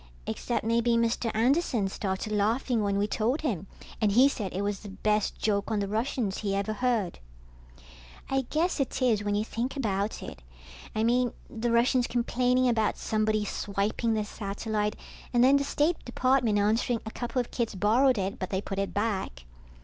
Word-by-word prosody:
Except 235 - -2
maybe 235 +1 +2
Mr. 230 0 +1
Anderson 245 - +2
started 190 +2 -3
laughing 225 +3 +1
when 200 -1 0
we 200 - +2
told 230 +7 0
him, 200 - -2 0.3
and 210 -2 +3
he 255 +5 +7
said 215 -9 -3
it 195 - -2
was 200 -1 -1
the 210 - -9
best 210 +1 0
joke 205 -2 0
on 220 - 0
the 200 - -1
Russians 220 -1 -1
he 200 -2 -1
ever 200 +2 -1
heard. 225 -5 0 1.1
I 270 -2 -1
guess 330 +2 0
it 275 - -1
is 230 -6 +2
when 205 0 0
you 210 +1 0
think 245 +5 -3
about 205 -4 -1
it. 65 - -8 0.5
I 215 - +1
mean, 245 +1 +2 0.2
the 230 +1 -2
Russians 240 +1 +3
complaining 250 +1 +1
about 220 -3 +1
somebody 215 -1 0
swiping 205 +3 -1
their 215 -1 -1
satellite 210 +1 -2 0.4
and 240 - +5
then 270 +2 +6
the 280 - 0
State 300 +4 0
Department 250 -3 +2
answering 225 +3 +1
a 220 - -5
couple 245 +2 -3
of 245 - -2
kids 230 -4 -2
borrowed 235 +6 +3
it, 195 0 -2
but 185 - -3
they 190 - -1
put 195 0 -4
it 195 - -2
back. 195 - -2
220 Hz, 180 wpm, -28 LUFS, 205-245 Hz, 1.1 s, he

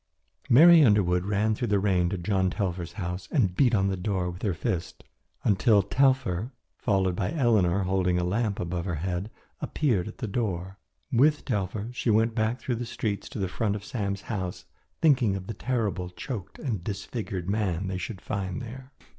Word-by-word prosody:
Mary 165 +7 +8
Underwood 95 -6 +3
ran 105 +2 +1
through 120 +3 -2
the 105 -1 +2
rain 95 -3 +2
to 95 - -2
John 95 +1 +1
Telfer's 90 -4 -3
house 90 -2 -4
and 100 - +1
beat 125 -1 +4
on 95 -1 +2
the 95 - 0
door 90 -1 -1
with 90 - -10
her 100 -6 0
fist 85 +1 -3 0.4
until 105 0 +4
Telfer, 125 -2 +1 0.3
followed 95 -4 +1
by 90 - -1
Eleanor, 105 - +2
holding 90 -1 +1
a 90 - 0
lamp 100 +3 0
above 85 0 -3
her 90 -3 -2
head, 90 +5 -3 0.3
appeared 115 - 0
at 110 - -9
the - - -4
door. 95 -4 -3 0.3
With 145 +4 +3
Telfer 100 +2 -2
she 125 - -1
went 110 +1 +3
back 110 +2 0
through 120 -3 -2
the 120 - -3
streets 105 -3 -3
to - - -8
the 95 -2 -1
front 105 +2 -1
of 105 0 -7
Sam's 100 -5 -3
house 95 -5 -4 0.4
thinking 130 -10 +4
of 95 -1 -5
the 110 - -5
terrible 105 -6 -2
choked 100 +2 -7
and 110 - -3
disfigured 100 -2 -4
man 95 -3 -1
they 95 -1 -3
should 95 +1 -6
find 95 -2 -3
there. 130 +2 -9
100 Hz, 185 wpm, -27 LUFS, 90-115 Hz, 0.4 s, Mary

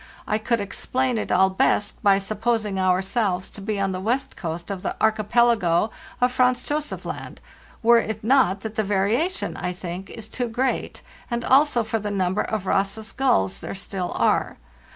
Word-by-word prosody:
I 215 - +1
could 230 +1 0
explain 250 +4 -1
it - - -4
all 190 +1 +4
best 205 +2 +1
by 200 -1 +5
supposing 215 0 -1
ourselves 190 +1 0
to 200 - -9
be 205 0 -2
on 195 -1 0
the 185 - -3
west 250 +7 -1
coast 170 +2 -5
of 190 -2 -4
the - - -3
archipelago 220 -3 +3 0.3
of 250 0 +3
Franz 250 0 +2
Josef 300 0 -3
Land, - - -6 0.4
were 235 +1 +7
it 220 -1 -4
not 220 -6 +3
that 220 0 -5
the 220 - 0
variation, 210 - 0
I 180 - -3
think, 180 +1 -7
is 220 -1 -8
too 245 +2 -3
great, 250 +3 -2 0.3
and 235 -1 -2
also 270 -3 +4
for 225 +1 -1
the 205 0 -4
number 190 -1 0
of 215 -3 -3
Ross's 200 +3 -1
gulls 95 - +1
there - - -6
still 190 -1 -4
are. - - +1
215 Hz, 175 wpm, -24 LUFS, 190-240 Hz, 0.4 s, were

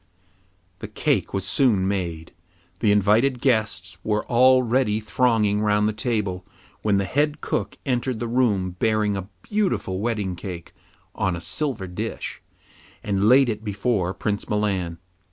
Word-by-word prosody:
The - - -6
cake - - 0
was 95 -1 -2
soon 105 -4 +3
made. 85 -4 -3 0.5
The 105 -3 +3
invited 110 +6 +3
guests 105 -8 0
were 105 -1 0
already 125 -2 +3
thronging 110 -2 +1
round 105 0 +2
the 110 - 0
table, 105 -5 -2 0.4
when 105 -2 +2
the 100 - 0
head 145 +6 0
cook - - -3
entered 125 -2 -1
the 120 - -2
room, 110 -7 +1
bearing 105 +2 +1
a 95 0 -5
beautiful 195 - -1
wedding 105 -4 -1
cake 85 -1 -8 0.4
on 95 -2 -1
a - - -5
silver 120 - -3
dish, 90 -1 -5 0.6
and 100 +1 +1
laid 130 +1 +6
it 110 -2 -3
before 105 -3 -1
Prince 105 -1 -3
Milan. 95 -5 -1
105 Hz, 140 wpm, -23 LUFS, 95-120 Hz, 0.6 s, laid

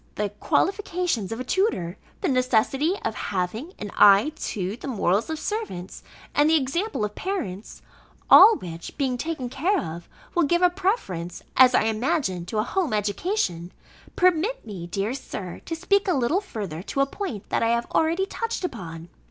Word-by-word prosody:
the 210 -1 -1
qualifications 360 - 0
of 225 - -4
a - - -2
tutor; 255 - 0 0.3
the - - 0
necessity 260 - +2
of - - 0
having 205 - -3
an 205 -1 -6
eye 205 +8 +6
to 195 - -3
the - - -8
morals 210 - +1
of 320 - -2
servants; 415 - -5 0.3
and 295 +1 +4
the 325 - +5
example 310 - 0
of 210 - -5
parents 260 - -5 0.4
(all 450 - +9
which, 170 -2 -8
being 265 -3 0
taken 290 -1 -3
care 345 +11 0
of, 170 - -7 0.2
will 345 - +2
give 345 +3 +2
a 360 - +6
preference, 195 - -2
as 255 -1 +7
I - - +4
imagine, 220 - -1
to 215 - -3
a 215 - +2
home 340 - -1
education); 205 - -1 0.4
permit 365 +7 +2
me, 185 -5 -7
dear 200 +6 -2
Sir, 190 -9 -7
to 330 - -2
speak 395 +4 +1
a 365 - +2
little 275 +9 +1
further 200 - -6
to 275 +8 -2
a - - +4
point, 275 - -6
that - - 0
I 230 - +2
have 235 0 +1
already 335 +4 +2
touched 455 +1 -4
upon. 170 - -7
255 Hz, 175 wpm, -25 LUFS, -, 0.4 s, all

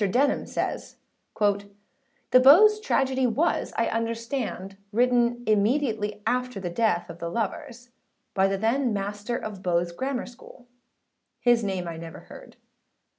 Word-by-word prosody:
Denham 255 +8 +1
says:â 205 -1 -3 0.7
â_The 255 - +7
Bowes 425 +10 +7
Tragedy_ 265 - +1
was, 320 +9 0
I - - +2
understand, 230 -3 -3 0.2
written 240 +1 +2
immediately 215 -1 0
after 250 -3 -1
the 180 -2 -4
death 215 -2 0
of 170 0 -10
the 170 - -4
lovers, 235 - -5 0.4
by 190 0 +3
the 195 0 -1
then 235 +4 +1
master 205 +4 -3
of 205 -3 -7
Bowes 175 -1 0
Grammar 260 +7 -3
School. 245 0 -15 0.7
His 240 -1 +3
name 190 -3 -2
I 165 -1 -6
never 165 0 -9
heard. - - -14
230 Hz, 130 wpm, -26 LUFS, 195-250 Hz, 0.7 s, â_The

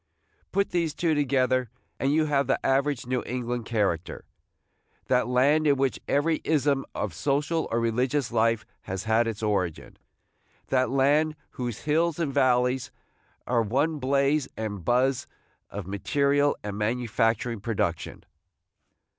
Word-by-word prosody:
Put 200 +1 0
these 165 -4 0
two 165 -2 +1
together, 130 -4 +1 0.3
and 135 - +1
you 155 +1 +3
have 140 -3 +1
the 135 - +2
average 135 -1 +1
New 125 0 -1
England 120 -1 -3
character, 100 -7 -1 0.4
– - - -43
that 125 -1 +3
land 140 +5 +3
in 140 - +5
which 135 -2 0
every 155 +3 +1
ism 145 -3 +1
of - - -3
social 150 +4 0
or 115 - 0
religious 125 +3 0
life 115 -1 +1 0.2
has 95 +1 -3
had 110 +1 +2
its 110 -1 -4
origin, 95 -6 -2 0.3
– - - -39
that 130 -1 +2
land 145 +4 +2 0.2
whose 120 -3 -5
hills 160 +1 +1
and 160 -5 -2
valleys 125 -1 +2 0.6
are 120 -1 +2
one 140 +8 0
blaze 140 +1 +1
and 105 -4 -4
buzz 125 +6 +1 0.4
of 100 -2 -6
material 140 - +1
and 105 0 -5
manufacturing 115 0 0
production. 95 -6 -2
130 Hz, 140 wpm, -26 LUFS, 115-145 Hz, 0.6 s, in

